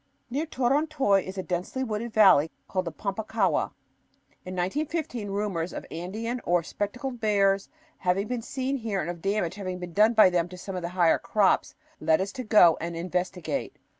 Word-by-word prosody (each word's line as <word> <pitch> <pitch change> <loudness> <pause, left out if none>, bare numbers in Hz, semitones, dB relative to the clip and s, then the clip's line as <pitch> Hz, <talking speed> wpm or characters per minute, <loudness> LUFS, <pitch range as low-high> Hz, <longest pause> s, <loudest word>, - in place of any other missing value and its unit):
Near 295 +6 -1
Torontoy 270 -6 +2
is 190 +1 -7
a 190 - -2
densely 180 +9 -3
wooded 225 0 -3
valley 190 -8 +6 0.2
called 185 -1 -1
the 165 - -3
Pampa 200 +4 -4
Ccahua. 210 -4 +1 0.7
In 185 0 -6
1915 250 - -2
rumors 195 -4 -2
of - - -6
Andean 220 +9 -4
or 175 -1 +2
"spectacled" 245 - -4
bears 200 -2 +2 0.3
having 190 +3 0
been 245 0 -2
seen 265 +3 -2
here 220 -5 -2
and 170 - -2
of 170 -1 -10
damage 195 -3 0
having 185 -2 -5
been 180 -1 -7
done 215 +4 +4
by 215 -4 +7
them 175 -1 +1
to 180 - -10
some 190 +1 -6
of 180 - -3
the 170 - -3
higher 170 -2 +4
crops, 205 -3 +2 0.2
led 160 -1 +3
us 195 +1 -2
to 255 - -6
go 210 -7 +6
and 170 +1 -4
investigate. 180 - -3
195 Hz, 185 wpm, -27 LUFS, 180-230 Hz, 0.7 s, by